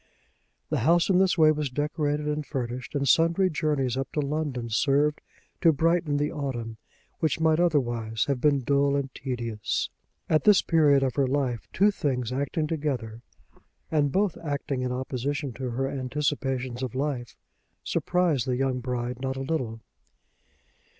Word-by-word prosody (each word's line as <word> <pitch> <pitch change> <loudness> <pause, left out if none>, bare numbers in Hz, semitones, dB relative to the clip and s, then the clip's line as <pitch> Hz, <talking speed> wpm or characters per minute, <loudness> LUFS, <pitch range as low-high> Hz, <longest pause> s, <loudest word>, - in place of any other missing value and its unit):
The - - +1
house 170 +4 +3
in 185 - +4
this 190 -2 +3
way 155 -1 +6
was 150 -2 -1
decorated 150 +2 -1
and 150 0 -1
furnished, 130 +1 -5
and 140 -1 0
sundry 165 +6 +4
journeys 150 -5 0
up 135 0 -3
to - - -1
London 145 -4 -2
served 145 +6 +2 0.4
to 165 - +6
brighten 160 -1 +1
the 145 +1 0
autumn 120 -6 -4 0.4
which 160 0 0
might 160 0 +3
otherwise 120 -10 +1
have 140 -3 -1
been 145 -2 +3
dull 140 +2 +2
and 140 -1 -2
tedious. 120 -5 -3 0.4
At 155 - +2
this 210 -3 +6
period 145 -4 +4
of 130 -2 0
her 140 -2 +3
life 130 -4 -1
two 205 +3 +4
things 130 - -2
acting 140 +4 -1
together, 135 -8 -3 0.7
and 145 -3 +2
both 195 +2 +1
acting 140 -3 -2
in 125 0 -1
opposition 130 +2 -3
to 130 +2 -4
her 130 +3 -1
anticipations 130 -2 -2
of 130 -1 -4
life, 130 -3 -3 0.5
surprised 170 -8 +1
the 125 -1 0
young 130 -1 0
bride 125 0 -3
not 130 0 -2
a - - -3
little. 130 -6 -3
140 Hz, 155 wpm, -27 LUFS, 125-155 Hz, 0.7 s, way